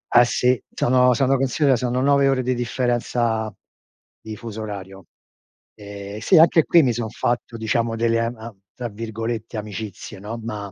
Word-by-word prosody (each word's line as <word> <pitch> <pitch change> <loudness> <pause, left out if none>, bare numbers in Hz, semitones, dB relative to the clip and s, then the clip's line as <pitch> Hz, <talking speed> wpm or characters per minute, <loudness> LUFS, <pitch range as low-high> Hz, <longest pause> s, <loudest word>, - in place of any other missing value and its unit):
Eh 120 - +8
sì, 125 -1 +1
sono 125 0 +4
sono 135 +1 +2
considera, 135 +1 +2
sono 125 +1 -1
9 140 0 +4
ore 130 -2 +1
di 130 - 0
differenza 120 -2 -1 0.7
di 110 -1 -7
fuso 110 0 -7
orario. 95 -3 -8 0.7
Eh, 100 0 -8
sì, 180 - +4
anche 160 0 +6
qui 170 -2 +5
mi 125 -3 +2
son 115 -1 -3
fatto 120 +1 -2
diciamo 115 +1 -1
delle, 115 0 +1
am 115 +1 -2
am 110 -3 -10 0.2
tra 120 -1 -5
virgolette 115 +1 -5
"amicizie" 105 -2 -7
no, 105 +4 -6
ma 105 -3 -5
115 Hz, 160 wpm, -22 LUFS, 110-125 Hz, 0.7 s, Eh